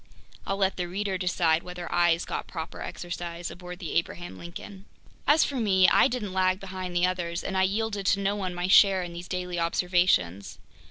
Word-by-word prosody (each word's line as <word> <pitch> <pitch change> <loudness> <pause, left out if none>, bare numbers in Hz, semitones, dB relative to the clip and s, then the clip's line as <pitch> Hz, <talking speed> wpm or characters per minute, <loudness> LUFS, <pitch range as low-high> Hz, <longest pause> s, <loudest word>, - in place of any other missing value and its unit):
I'll 195 - -1
let 195 -1 +1
the 180 -1 -2
reader 195 +2 -2
decide 170 -3 +2
whether 180 -1 -7
eyes 175 -1 +3
got - - -4
proper 160 -2 -7
exercise 175 -1 -5
aboard 180 0 -9
the 175 -4 -6
Abraham 175 +1 -2
Lincoln. 190 +3 -9 0.4
As 300 +2 +6
for 280 - -2
me, 190 -5 +4
I - - +5
didn't 215 -6 -4
lag 185 0 +2
behind 185 -2 -6
the 175 +1 +3
others 175 -2 -2
and 195 - -4
I 190 - +3
yielded 200 +1 0
to 200 - +3
no 200 +1 0
one 185 -3 -3
my 175 +1 -2
share 190 -1 +6
in 175 -1 -7
these 175 +1 -8
daily 180 -1 -3
observations. 170 - +1
180 Hz, 195 wpm, -27 LUFS, 175-195 Hz, 0.4 s, As